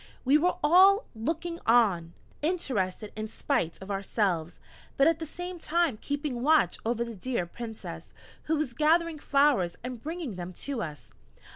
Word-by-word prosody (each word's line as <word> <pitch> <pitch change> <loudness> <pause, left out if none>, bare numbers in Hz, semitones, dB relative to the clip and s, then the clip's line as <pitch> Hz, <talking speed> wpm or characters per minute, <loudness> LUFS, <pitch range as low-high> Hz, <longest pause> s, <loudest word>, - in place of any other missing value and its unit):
We 270 +3 +5
were 345 +4 +3
all 380 +7 +6
looking 330 +9 -3
on, 195 -8 +3 0.3
interested 235 - -1
in 215 0 -4
spite 165 -5 -1
of 195 - -7
ourselves, 195 -4 -1 0.4
but 275 - +5
at 325 -1 +3
the 320 - -5
same 355 +3 -6
time 325 -8 0
keeping 285 -4 -3
watch 310 +3 +3
over 235 +1 0
the 235 - -7
dear 225 -1 -2
Princess, 225 +5 -8 0.3
who 320 - +1
was 295 -5 -2
gathering 320 +2 +2
flowers 275 -13 +2
and 250 -2 -6
bringing 315 - -5
them 180 +1 -6
to 265 +6 -4
us. 150 -6 -7
255 Hz, 155 wpm, -28 LUFS, 210-320 Hz, 0.4 s, all